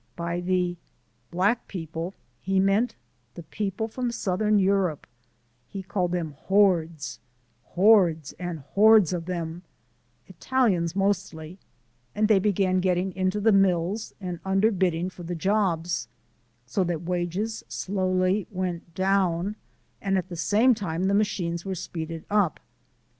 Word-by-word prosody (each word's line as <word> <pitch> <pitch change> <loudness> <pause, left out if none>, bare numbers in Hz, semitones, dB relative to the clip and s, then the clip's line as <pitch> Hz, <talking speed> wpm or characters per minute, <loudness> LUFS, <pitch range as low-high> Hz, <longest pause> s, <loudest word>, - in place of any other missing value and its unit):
By 170 +1 -3
the 180 -1 0 0.5
"black 200 +7 +1
people" 165 0 -5 0.3
he 190 0 +1
meant 195 +5 +2 0.4
the 170 - -8
people 205 +6 -3
from 245 +2 -3
Southern 210 -1 +1
Europe, 190 -5 +1 0.6
he 195 -2 -7
called 180 -1 -1
them 170 -3 -2 0.2
"hordes" 175 -6 +2 0.5
"hordes 180 -6 +3
and 175 -4 -4
hordes 210 -4 +6
of 175 0 -4
'em" 170 -1 -4 0.6
Italians 190 -10 0
mostly, 190 -4 -2 0.6
and 215 +1 +2
they 210 -3 +5
began 190 -2 +1
getting 185 0 0
into 185 +2 0
the 220 +2 +4
mills 195 +1 +1
and 180 -4 -5
underbidding 190 -3 +1
for 180 - -12
the 175 +1 -4
jobs, 175 -2 0 0.6
so 125 +10 0
that 175 -2 -2
wages 180 +5 -2
slowly 185 0 0
went 180 -3 -4
down 190 0 +1 0.5
and 195 -1 +1
at 185 - -3
the 175 - -6
same 215 +9 +3
time 185 -6 -3
the 195 +1 +2
machines 180 -5 0
were 190 -1 -3
speeded 165 -1 -6
up. 205 -5 +1
185 Hz, 130 wpm, -26 LUFS, 170-200 Hz, 0.6 s, hordes